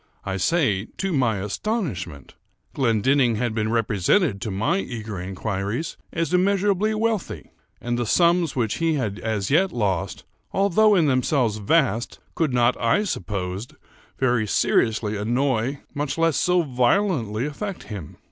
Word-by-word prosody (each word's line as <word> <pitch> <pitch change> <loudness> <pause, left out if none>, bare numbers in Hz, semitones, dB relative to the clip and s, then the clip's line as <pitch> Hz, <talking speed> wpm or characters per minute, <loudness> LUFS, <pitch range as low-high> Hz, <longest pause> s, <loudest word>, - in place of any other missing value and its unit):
I 95 0 -2
say 105 - +1
to 195 -1 -1
my 120 -7 +2
astonishment. 105 - -4 0.4
Glendinning 125 0 +2
had 120 0 -1
been 110 -1 -1
represented 110 - +1
to 115 - -3
my 100 0 0
eager 105 -1 -5
inquiries 100 - -3 0.2
as 165 0 -2
immeasurably 200 +3 +2
wealthy; 220 -2 -2 0.3
and 120 0 -2
the 120 - -1
sums 170 +1 +3
which 115 -5 0
he 165 -1 +1
had 110 -7 -2
as 110 -2 -2
yet 185 +5 +3
lost, 100 -7 -2 0.3
although 200 +2 +4
in 170 -4 +4
themselves 130 -4 +1
vast, 115 +1 +1 0.2
could 160 -4 0
not, 120 0 +3
I 120 - +3
supposed, 95 - -4 0.4
very 120 -4 +1
seriously 110 +1 +1
annoy, 125 +4 0
much 145 0 -3
less 165 -2 +2
so 180 -1 +2
violently 125 - +1
affect 185 +7 -5
him. 100 -9 -8
125 Hz, 140 wpm, -23 LUFS, 105-165 Hz, 0.4 s, although